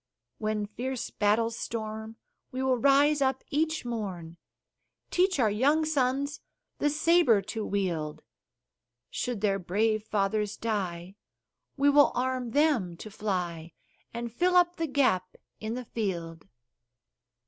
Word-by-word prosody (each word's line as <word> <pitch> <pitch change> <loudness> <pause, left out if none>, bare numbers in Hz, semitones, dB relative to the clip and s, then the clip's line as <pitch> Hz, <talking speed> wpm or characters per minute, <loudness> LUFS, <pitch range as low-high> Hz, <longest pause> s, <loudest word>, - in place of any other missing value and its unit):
When 215 -1 -1
fierce 245 +5 -4
battles 225 +2 +1
storm, 220 -1 -5 0.4
we 260 +1 -3
will 260 -2 +2
rise 280 +3 +4
up 265 -1 +1
each 315 0 0
morn, 185 -8 -5 0.7
Teach 370 0 +2
our 220 -4 +3
young 285 +9 +2
sons 280 -1 0 0.4
the 295 - +2
saber 305 -6 +4
to 220 +2 -4
wield: 170 -7 -2 0.9
Should 245 -5 -3
their 200 -2 +1
brave 215 +4 0
fathers 210 0 -1
die, 190 -4 -3 0.6
we 280 +1 +3
will 290 0 +6
arm 255 0 -1
them 245 - +1
to 215 - -9
fly 175 -6 -3 0.4
And 235 -1 -5
fill 360 +7 +2
up 355 0 +4
the 330 -1 -1
gap 220 -11 +1 0.2
in 220 +1 -4
the 250 0 -5
field. 170 -7 -4
225 Hz, 125 wpm, -28 LUFS, 200-275 Hz, 0.9 s, will